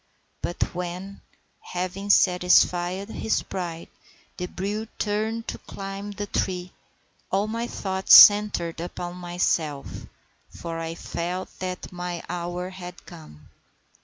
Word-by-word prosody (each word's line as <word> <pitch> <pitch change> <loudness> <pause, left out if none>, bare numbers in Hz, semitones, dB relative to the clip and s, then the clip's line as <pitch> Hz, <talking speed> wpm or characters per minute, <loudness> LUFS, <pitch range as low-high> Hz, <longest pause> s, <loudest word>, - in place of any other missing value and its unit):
But 175 - -2
when, 180 +3 -5 0.4
having 185 +3 -4
satisfied 180 0 +4
his 220 - -1
pride, 170 -3 -5 0.5
the 180 - -3
brute 205 +4 -4
turned 220 +2 -1
to - - -5
climb 195 +1 -7
the 205 0 -4
tree, 185 -2 -2 0.6
all 195 +2 +2
my 230 +2 -3
thoughts 190 -3 +4
centred 205 -5 +8
upon 175 0 -5
myself, 175 -5 -2 0.4
for 165 -1 -6
I 165 0 -4
felt 175 +2 -4
that 185 -1 -5
my 175 -1 -5
hour 175 +1 -4
had 180 -1 -10
come. 115 - -13
180 Hz, 115 wpm, -25 LUFS, 175-200 Hz, 0.6 s, centred